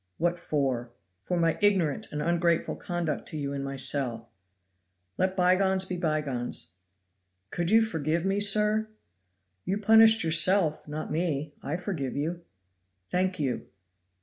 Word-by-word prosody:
"What 175 +1 -1
for!" 135 -7 -2 0.3
"For 180 - -3
my 165 -1 +1
ignorant 190 -8 +1
and 150 0 -3
ungrateful 170 0 0
conduct 175 -3 -4
to 155 - -6
you 140 -1 -4
in 140 -1 -4
my 135 0 -5
cell." 125 -4 +2 0.9
"Let 185 +1 0
bygones 190 +1 +2
be 185 - -4
bygones!" 150 - -3 0.8
"Could 170 -1 -2
you 225 +2 +5
forgive 165 -4 -2
me, 195 +1 0
sir?" 210 +1 +3 0.8
"You 195 - -2
punished 220 +1 +5
yourself, 165 0 +3
not 155 +1 -6
me; 155 -3 -2
I 150 +4 -3
forgive 170 -8 -4
you." 165 +5 -3 0.7
"Thank 185 +1 0
you." 135 -4 -3
170 Hz, 135 wpm, -27 LUFS, 145-190 Hz, 0.9 s, you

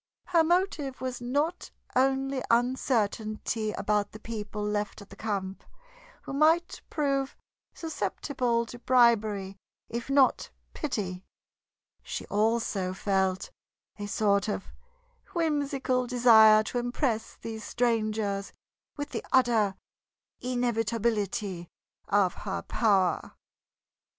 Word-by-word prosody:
Her 335 -2 +5
motive 320 -6 0
was 255 -1 -4
not 290 +8 -1 0.3
only 270 +1 +2
uncertainty 225 -3 0
about 205 -1 0
the 215 - -9
people 210 -2 -5
left 210 0 -2
at 200 -1 -14
the - - -10
camp, 195 -3 -3 0.6
who - - -6
might 320 +4 +3
prove 275 -3 -1 0.4
susceptible 245 - -1
to 240 +1 -10
bribery 220 -6 +3 0.3
if 235 +2 -5
not 275 -1 +3 0.2
pity; 190 -10 -3 0.8
she - - -5
also 210 -3 +1
felt 190 -1 0 0.5
a 205 - -4
sort 200 -1 +2
of 200 - -4 0.6
whimsical 280 -6 0
desire 220 -3 +7
to 245 - -2
impress 240 -2 -1
these 220 -1 -7
strangers 215 -4 0 0.5
with 290 0 -4
the - - -4
utter 230 -6 +3 0.7
inevitability 225 -6 -1 0.4
of 195 -3 +3
her 195 -1 -4
power. 195 -6 +1
230 Hz, 100 wpm, -28 LUFS, 205-260 Hz, 0.8 s, desire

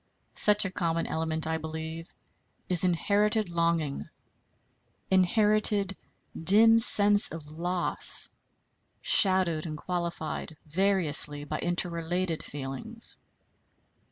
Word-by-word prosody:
Such 210 -1 +3
a 190 - -5
common 165 -2 -3
element, 160 0 -2
I 160 0 -3
believe, 160 +1 -9 0.5
is 180 -2 +5
inherited 205 +3 -1
longing, 170 -4 -3 1.0
inherited 205 +1 +1 0.5
dim 225 +5 +6
sense 205 -3 +6
of 155 -2 -11
loss, 175 +2 +2 0.7
shadowed 185 -5 +1
and 155 -1 -7
qualified 170 -2 -6
variously 155 -4 +1
by 155 +1 -6
interrelated 175 0 -3
feelings. 145 - -9
175 Hz, 90 wpm, -26 LUFS, 160-195 Hz, 1.0 s, dim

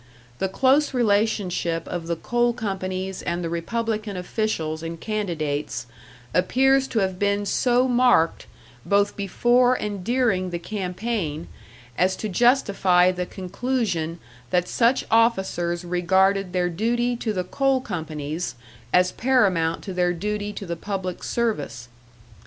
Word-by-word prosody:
The 190 - 0
close 270 +7 +2
relationship 200 -7 +1
of 170 -2 -4
the 170 - 0
coal 240 +7 +1
companies 190 -4 -4
and 175 0 -2
the 165 - -3
Republican 215 +3 -2
officials 175 -5 -2
and 165 0 -6
candidates 155 - -3 0.5
appears 270 +7 +3
to 240 - -4
have 190 -1 -1
been 205 0 +1
so 250 +4 +2
marked 245 -9 +3 0.4
both 200 0 +2
before 240 +5 +3
and 205 -5 -4
during 225 -6 +1
the 175 - -3
campaign, 185 -3 -3 0.5
as 185 +1 +3
to 215 - -4
justify 195 -5 +4
the 180 -1 -4
conclusion 185 -4 -2 0.3
that 180 +3 +1
such 240 +2 +2
officers 190 -6 +2
regarded 190 +2 +2
their 180 0 +1
duty 240 +6 0
to 225 -2 -2
the 185 -3 -1
coal 270 +7 +1
companies 160 - -4 0.4
as 180 0 +4
paramount 190 -11 +2
to 190 - -5
their 180 -1 +1
duty 210 +3 -3
to 200 - -6
the 170 -1 -3
public 185 0 -4
service. 145 - -2
190 Hz, 130 wpm, -24 LUFS, 175-230 Hz, 0.5 s, justify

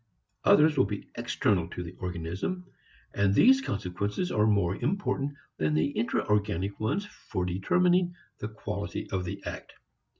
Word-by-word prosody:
Others 150 -1 +6
will - - +6
be 100 -1 -6
external 90 -5 +1
to 90 - -5
the 85 - -7
organism, 90 - -3 0.5
and 100 0 +2
these 265 - +7
consequences 100 - -2
are 105 0 +3
more 100 -4 +2
important 145 -8 -1 0.2
than 75 -1 +1
the 80 - +2
intra 120 -4 0
organic 105 -2 0
ones 150 - 0
for 95 - -4
determining 175 - +2 0.2
the 105 - -3
quality 110 - -4
of 95 -1 -1
the 100 +2 -5
act. - - -6
105 Hz, 145 wpm, -29 LUFS, 90-150 Hz, 0.5 s, these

